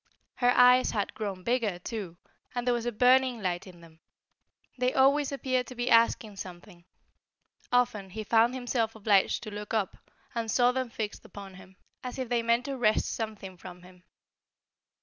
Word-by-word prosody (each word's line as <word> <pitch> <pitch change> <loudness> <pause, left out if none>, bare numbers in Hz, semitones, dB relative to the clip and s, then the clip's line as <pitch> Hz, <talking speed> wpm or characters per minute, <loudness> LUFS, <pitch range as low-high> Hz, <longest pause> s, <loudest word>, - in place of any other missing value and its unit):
Her 245 -1 +3
eyes 250 +1 +6
had 205 -2 -2
grown 195 -4 -5
bigger, 230 -5 0
too, 180 -2 -6 0.4
and 245 0 -2
there 245 - +2
was 240 0 -2
a - - 0
burning 250 +1 +3
light 180 -2 -3
in 175 -2 -14
them. 165 -1 -17 0.8
They 250 0 0
always 280 +2 +3
appeared 255 -3 -1
to 255 - -9
be 240 0 -2
asking 230 -2 +3
something; 175 -1 -10 0.9
often 245 -6 +1
he 215 +4 -6
found 230 +3 +3
himself 240 -3 -1
obliged 205 -2 +2
to 215 - -7
look 210 +2 -5
up, 205 -4 -1 0.4
and 230 -1 -3
saw 245 +3 +4
them 260 -1 -2
fixed 220 -2 -5
upon 200 -2 -11
him, 190 0 -15 0.3
as 250 +1 -6
if 260 -3 -4
they 240 -1 +1
meant 235 +2 +1
to 275 -1 -4
wrest 215 -2 +2
something 210 -4 -6
from 180 0 -11
him. 180 0 -17
225 Hz, 175 wpm, -28 LUFS, 195-250 Hz, 0.9 s, eyes